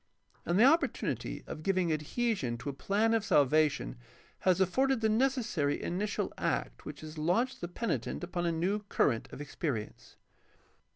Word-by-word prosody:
And 170 +2 +2
the - - +7
opportunity 320 +6 +1
of 155 - -7
giving 185 -2 +1
adhesion 155 - -1
to 140 - -5
a - - -4
plan 210 +10 +1
of 225 -2 +2
salvation 150 - +2 0.4
has 185 -1 +2
afforded 260 +8 +2
the 220 - +3
necessary 220 - +1
initial 200 +4 -2
act - - -2
which - - -8
has 155 0 -8
launched 190 +12 +1
the 175 - -3
penitent 225 +1 -3
upon 175 0 -2
a - - +2
new 180 +6 0
current 115 -5 +1
of - - -8
experience. 140 - -5
175 Hz, 155 wpm, -31 LUFS, 155-220 Hz, 0.4 s, the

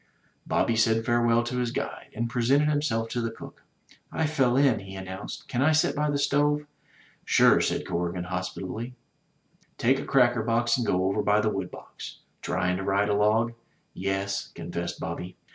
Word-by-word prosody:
Bobby 115 - +1
said 115 0 +2
farewell 120 0 +3
to 125 +1 -3
his 120 -1 -1
guide, - - -4
and 115 +1 -1
presented 130 +5 +2
himself 145 -7 0
to 120 - -2
the 115 - -1
cook. 115 - -11 0.5
I 160 - 0
fell 135 -5 +2
in/' 130 -6 +3
he 95 0 -9
announced, 95 0 -7
"can 125 - -1
I 155 +3 +4
sit 155 - +2
by 150 +1 0
the 145 - +1
stove?" 145 +1 +2 0.6
"Sure," - - +5
said - - -1
Corrigan, 85 +1 -2
hospitably. 95 +6 -5 0.8
"Take 130 +3 +2
a - - -5
cracker 120 -3 +3
box 115 +1 +2
and 120 -3 -2
go 90 0 +2
over 100 +2 +1
by 105 0 +3
the 105 0 +1
wood 95 -3 -3
box. - - -10 0.2
Tryin' 90 0 0
to 95 - -4
ride 100 +1 +1
a - - +2
log?" 110 +3 +2 0.4
"Yes," 95 +1 -2
confessed 85 +1 -5
Bobby. 90 +2 -5
115 Hz, 180 wpm, -27 LUFS, 95-125 Hz, 0.8 s, Sure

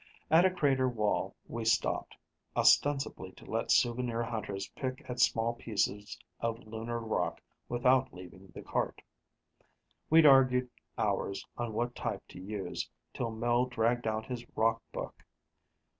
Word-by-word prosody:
At 165 +3 +7
a - - +6
crater 135 -7 +2
wall, 105 -4 -1
we 115 -1 -4
stopped, 110 0 +1 0.4
ostensibly 145 -1 +3
to - - -15
let - - -2
souvenir 120 -1 +2
hunters 105 -4 -4
pick 130 -1 -5
at 125 -1 -5
small 115 +1 +3
pieces 105 -3 -2 0.2
of 115 -1 -1
lunar 115 +2 -4
rock 115 -1 -1 0.3
without 130 +2 +3
leaving 95 +1 -12
the 85 - -10
cart. - - -2 1.1
We'd 160 0 +7
argued 130 -3 +6 0.3
hours 100 - -1
on 120 -2 -3
what 120 +2 -1
type 110 -5 -4
to - - -10
use, 95 -4 -4 0.2
till 120 -3 -2
Mel 120 +2 +1
dragged 120 0 0
out 110 0 -1
his 125 -1 -5
rock 115 +1 +2
book. - - -6
120 Hz, 140 wpm, -31 LUFS, 110-125 Hz, 1.1 s, At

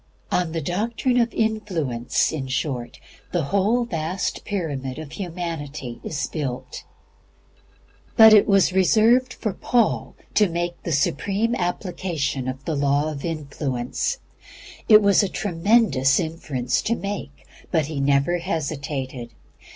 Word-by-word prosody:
On 175 -2 +1
the 165 0 -2
doctrine 225 - -1
of 235 -1 +2
Influence, 180 - 0
in 140 -4 -4
short, 130 -2 -3 0.3
the 175 -2 0
whole 200 - +1
vast 175 -1 -3
pyramid 145 -10 -3
of 155 -2 -8
humanity 160 -8 -5
is 140 -4 -2
built. 135 -4 -5 1.3
But 220 -1 +10
it 210 - +6
was 195 -2 +4
reserved 225 +7 +4
for 215 - -3
Paul 230 +3 0 0.2
to 210 -3 +4
make 175 +1 -3
the 170 - -4
supreme 195 - 0
application 175 - -2
of 130 +2 -5
the 160 - -1
Law 145 +2 +1
of 140 -2 -7
Influence. 145 - -2 0.7
It 215 -1 +8
was 200 -1 +5
a 200 - 0
tremendous 170 - +2
inference 150 -7 -2
to 230 - 0
make, 200 -9 -6 0.2
but 160 -4 +1
he 150 -1 -4
never 140 +5 +2
hesitated. 140 -6 -4
165 Hz, 130 wpm, -23 LUFS, 140-200 Hz, 1.3 s, But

